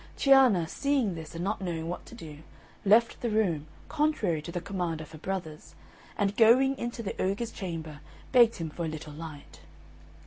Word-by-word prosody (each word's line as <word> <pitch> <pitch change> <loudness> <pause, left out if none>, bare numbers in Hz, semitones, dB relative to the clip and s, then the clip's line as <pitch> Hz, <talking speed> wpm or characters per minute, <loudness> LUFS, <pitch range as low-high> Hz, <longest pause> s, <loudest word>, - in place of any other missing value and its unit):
Cianna 260 - +5
seeing 275 - 0
this, 160 -1 -8
and 170 - -4
not 205 +2 -2
knowing 165 -3 -3
what 175 - -6
to - - -11
do, 155 -9 -10 0.4
left 220 +3 +4
the 240 - -1
room, 180 -9 0 0.2
contrary 295 - 0
to 170 - -8
the 175 - -3
command 175 -3 -3
of 155 0 -9
her 155 - -11
brothers, 165 -4 -6 0.4
and 200 0 0
going 255 +4 +5
into 235 0 -4
the 200 - -4
ogre's 200 +5 -1
chamber 160 -6 -6 0.3
begged 240 -3 +6
him 165 -2 -5
for 170 - -5
a - - -2
little 155 -1 -7
light. 155 -2 -10
185 Hz, 180 wpm, -28 LUFS, 160-230 Hz, 0.4 s, begged